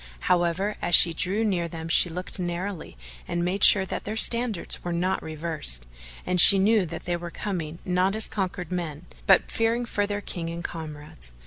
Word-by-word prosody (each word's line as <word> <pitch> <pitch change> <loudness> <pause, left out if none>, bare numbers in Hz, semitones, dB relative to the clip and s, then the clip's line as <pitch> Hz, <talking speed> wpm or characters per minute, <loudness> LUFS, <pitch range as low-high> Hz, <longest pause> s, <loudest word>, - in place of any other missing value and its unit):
However, 180 +4 0
as 175 - +3
she 170 - +8
drew 195 +7 0
near 180 -5 -1
them 160 0 -8
she 170 +2 +4
looked 180 +3 -7
narrowly 175 - -5 0.3
and 175 0 -2
made 185 +2 -1
sure 190 -2 +7
that - - -6
their 215 - -5
standards 235 -4 -1
were 175 - -4
not 180 +3 -1
reversed,[FN#436] - - -5
and 180 -1 +3
she 195 - +10
knew 200 -1 +2
that - - -8
they 175 -1 -2
were 170 0 -8
coming 170 -5 -5
not 185 +2 0
as 220 - -2
conquered 185 -3 -5
men, 170 -3 -5 0.2
but 195 - +4
fearing 230 +2 -1
for 205 -3 -2
their 205 0 -4
King 170 -4 -6
and 170 +1 -7
comrades. 150 - -7
175 Hz, 190 wpm, -25 LUFS, 165-195 Hz, 0.3 s, she